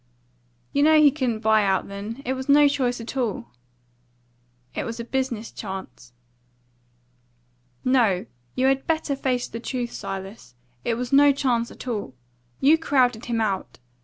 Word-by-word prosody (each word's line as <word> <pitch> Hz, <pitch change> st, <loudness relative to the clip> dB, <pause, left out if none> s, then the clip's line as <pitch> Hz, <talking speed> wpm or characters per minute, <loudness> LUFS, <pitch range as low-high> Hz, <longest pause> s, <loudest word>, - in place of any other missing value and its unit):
"You 285 Hz, -, +2 dB
know 310 Hz, +1 st, +6 dB
he 295 Hz, -2 st, +7 dB
couldn't 250 Hz, -6 st, -2 dB
buy 220 Hz, -1 st, +4 dB
out 190 Hz, -2 st, +1 dB
then. 210 Hz, +6 st, -7 dB
It 260 Hz, -, 0 dB
was 260 Hz, +1 st, -6 dB
no 290 Hz, +1 st, +7 dB
choice 255 Hz, -4 st, 0 dB
at 230 Hz, +3 st, -7 dB
all." 245 Hz, -1 st, -2 dB, 1.2 s
"It -, -, -3 dB
was 230 Hz, +1 st, -5 dB
a -, -, -3 dB
business 240 Hz, -3 st, -3 dB
chance." 190 Hz, -, -8 dB, 1.7 s
"No; 235 Hz, -8 st, +3 dB, 0.3 s
you 255 Hz, -, +1 dB
had 270 Hz, 0 st, +2 dB
better 315 Hz, -3 st, 0 dB
face 255 Hz, -2 st, -1 dB
the 230 Hz, -, -7 dB
truth, 245 Hz, 0 st, -3 dB
Silas. 195 Hz, -, -7 dB, 0.3 s
It 230 Hz, -, 0 dB
was 250 Hz, +3 st, -4 dB
no 285 Hz, +1 st, +7 dB
chance 250 Hz, -4 st, 0 dB
at -, -, -11 dB
all. 205 Hz, -, -4 dB, 0.4 s
You 310 Hz, +4 st, +5 dB
crowded 250 Hz, -7 st, +2 dB
him 235 Hz, -1 st, -1 dB
out. 200 Hz, -4 st, -2 dB
245 Hz, 155 wpm, -24 LUFS, 220-270 Hz, 1.7 s, he